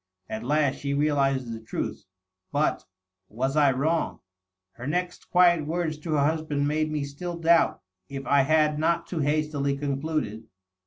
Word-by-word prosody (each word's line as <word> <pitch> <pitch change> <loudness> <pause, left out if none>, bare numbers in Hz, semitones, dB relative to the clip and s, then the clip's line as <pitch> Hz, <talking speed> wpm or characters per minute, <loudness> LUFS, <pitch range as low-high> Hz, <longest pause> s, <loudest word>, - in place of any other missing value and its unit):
^ - - -3
At 110 - -5
last 145 +2 +1
she 140 0 -2
realizes 135 -4 +1
the 115 - -6
truth.' 110 - -5 0.5
But.. 145 +2 0 0.4
was 130 +6 -2
I 145 -3 +5
wrong? 155 +6 -1 0.5
Her 120 +6 -8
next 180 +3 -3
quiet 175 -4 +4
words 160 -2 -2
to 155 +1 -3
her 145 -2 +3
husband 150 -2 0
made 155 +1 0
me 150 -2 -1
still 170 +5 -5
doubt 170 0 +3 0.3
if 135 0 -6
I 140 0 +4
had 150 +1 +2
not 165 +2 +1
too 170 - -4
hastily 145 -1 0
concluded. 140 -6 -2
150 Hz, 160 wpm, -26 LUFS, 140-160 Hz, 0.5 s, I